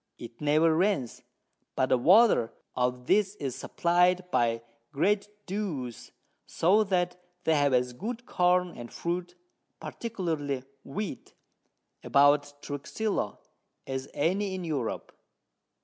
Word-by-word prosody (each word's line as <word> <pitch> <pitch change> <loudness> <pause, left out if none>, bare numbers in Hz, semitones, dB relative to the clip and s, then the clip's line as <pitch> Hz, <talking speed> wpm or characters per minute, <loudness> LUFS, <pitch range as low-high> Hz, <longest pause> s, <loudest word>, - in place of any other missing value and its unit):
it 115 +2 -11
never 155 +2 +3
rains, 170 - 0 0.5
but 130 - +1
the - - +4
Want 185 - +5 0.3
of 125 0 -1
this 205 +6 +2
is 135 - -4
supply'd 180 +1 +2
by 115 -4 +1 0.3
great 200 +8 +1 0.2
Dews, 170 - -4 0.4
so 200 +6 +3
that 180 -2 0 0.2
they 160 - +3
have 145 -2 +3
as 125 -1 +1
good 230 - -5
Corn 180 -3 +2
and 120 0 -9
Fruit, 175 +1 -3 0.4
particularly 160 - -3 0.2
Wheat, 160 +2 -6 0.7
about 145 +1 +3
Truxillo, 145 - -3 0.5
as 130 0 -4
any 190 +5 0
in 185 - -5
Europe. 145 -9 -3
160 Hz, 115 wpm, -28 LUFS, 135-190 Hz, 0.7 s, Want